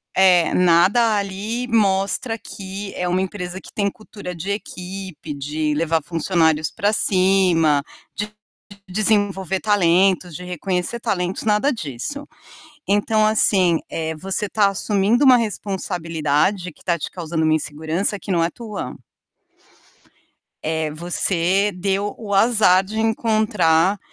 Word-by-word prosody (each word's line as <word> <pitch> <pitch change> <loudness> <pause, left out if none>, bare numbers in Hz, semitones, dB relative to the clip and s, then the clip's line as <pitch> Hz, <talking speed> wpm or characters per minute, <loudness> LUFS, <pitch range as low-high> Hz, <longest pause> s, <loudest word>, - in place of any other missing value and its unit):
É, 180 -3 +4
nada 185 +6 +4
ali 205 +5 -3
mostra 215 +2 +1
que 195 -1 -7
é 180 - -2
uma 180 +1 +1
empresa 185 -1 -5
que - - -14
tem 200 -1 0
cultura 205 -4 -9
de 190 +5 -4
equipe, 185 -6 -6
de 150 +2 -2
levar 160 0 0
funcionários 160 -1 +1
pra 210 0 0
cima, 185 -7 +3 0.3
de 210 +1 -4 0.6
desenvolver 195 -1 +1
talentos, 185 -3 +2
de 180 - -8
reconhecer 180 +5 -3
talentos, 185 -5 -2
nada 215 +7 +2
disso. 225 - -5 0.6
Então, 215 +1 +2
assim, 190 -5 +3
eh, 160 0 -3
você 195 +5 -2
tá 205 -1 +3
assumindo 205 +4 +1
uma 255 - +8
responsabilidade 180 -5 -1
que - - -21
tá 170 -2 0
te - - -5
causando 165 -2 -3
uma 155 - +3
insegurança 160 +7 -2
que 195 - -5
não 170 - +2
é 165 - +2
tua. 215 -2 -7 1.7
Eh, 160 -1 -1
você 175 +4 +1
deu 195 +2 -2
o 210 -3 -5
azar 195 -3 +4
de 215 +3 -6
encontrar 210 -5 +2
190 Hz, 125 wpm, -21 LUFS, 170-210 Hz, 1.7 s, uma